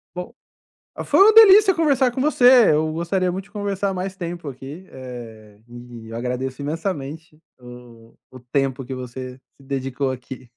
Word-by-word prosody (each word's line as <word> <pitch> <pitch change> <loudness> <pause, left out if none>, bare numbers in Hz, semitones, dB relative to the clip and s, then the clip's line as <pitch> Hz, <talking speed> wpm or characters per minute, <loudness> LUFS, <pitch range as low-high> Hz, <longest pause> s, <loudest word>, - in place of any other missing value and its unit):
Bom, 180 +6 -7 0.7
foi - - +1
uma 410 +3 +7
delícia 420 -3 +8
conversar 280 -6 +2
com 260 - -4
você, 255 -4 +5
eu 155 +1 +1
gostaria 180 +3 -1
muito 190 +2 -6
de - - -24
conversar 200 -1 -3
mais 190 +1 -4
tempo 170 -3 -6
aqui, 140 +7 -10
eh, 115 -5 -11
e 120 -1 -12
eu 115 - -7
agradeço 125 +2 -4
imensamente 155 -1 -5 0.2
o 120 -2 -15
o 130 - -12
tempo 135 +1 -2
que 130 - -6
você 130 0 -8
se - - -26 0.2
dedicou 135 0 -3
aqui. 130 0 -10
140 Hz, 160 wpm, -21 LUFS, 125-190 Hz, 0.7 s, delícia